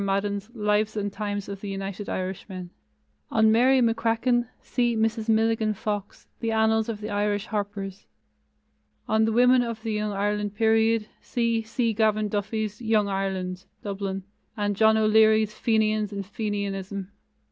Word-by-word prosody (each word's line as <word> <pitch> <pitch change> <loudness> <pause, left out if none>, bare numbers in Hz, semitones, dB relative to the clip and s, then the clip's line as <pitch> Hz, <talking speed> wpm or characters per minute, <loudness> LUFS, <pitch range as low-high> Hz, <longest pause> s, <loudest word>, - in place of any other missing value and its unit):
Madden's 200 +1 -1
Lives 210 0 +1
and 205 -1 -2
Times 205 -1 -3
of 200 -1 -7
the 205 - -5
United 195 +1 -5
Irishmen. 185 -1 -5 0.6
On 220 0 +4
Mary 255 +4 +5
McCracken, 230 +1 +2
see 240 -2 0
Mrs. 225 0 0
Milligan 220 -1 +2
Fox, 205 0 -4
The 230 - -2
Annals 220 0 +2
of 215 -2 -4
the 210 0 -5
Irish 205 0 0
Harpers. 200 -2 -4 1.0
On 220 0 +3
the 225 - +1
women 250 +2 +5
of 230 -2 -4
the 225 -2 -2
Young 210 0 -1
Ireland 205 0 -1
period, 225 0 +3
see 230 -2 0
C. 225 +1 -1
Gavan 215 -1 +2
Duffy's 210 +1 -2
Young 220 -3 +2
Ireland 190 -1 -3 0.2
(Dublin), 195 -1 -3 0.3
and 205 -1 0
John 220 +2 +5
O'Leary's 220 0 +4
Fenians 215 -2 +1
and 200 -1 -4
Fenianism. 200 -2 -4
215 Hz, 145 wpm, -26 LUFS, 200-225 Hz, 1.0 s, Mary